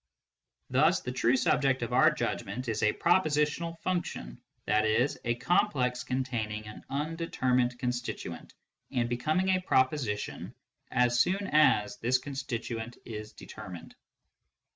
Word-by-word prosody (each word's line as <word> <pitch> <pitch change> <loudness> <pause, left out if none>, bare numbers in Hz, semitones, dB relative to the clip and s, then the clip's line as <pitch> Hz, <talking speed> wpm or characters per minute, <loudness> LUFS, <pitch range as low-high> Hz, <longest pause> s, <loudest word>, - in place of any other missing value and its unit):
Thus 155 +8 +4
the 125 - -4
true 130 0 +2
subject 135 -1 +2
of 115 - -3
our - - +6
judgment 120 +6 -3
is 110 -1 -1
a 105 -1 +4
prepositional 165 0 +1
function, 170 - -3 0.3
i.e. 110 +4 +3 0.2
a 120 0 +1
complex 130 - +1
containing 115 -5 -2
an 105 - -10
undetermined 135 -5 0
constituent, 125 -1 -4 0.3
and 120 -2 0
becoming 155 +10 0
a 185 -1 +3
proposition 130 - 0 0.3
as 120 -1 +2
soon 190 +10 +2
as 105 -9 +4
this 125 +3 +2
constituent 120 -4 -5
is 110 -2 -7
determined. 90 -3 -10
125 Hz, 120 wpm, -30 LUFS, 115-150 Hz, 0.3 s, our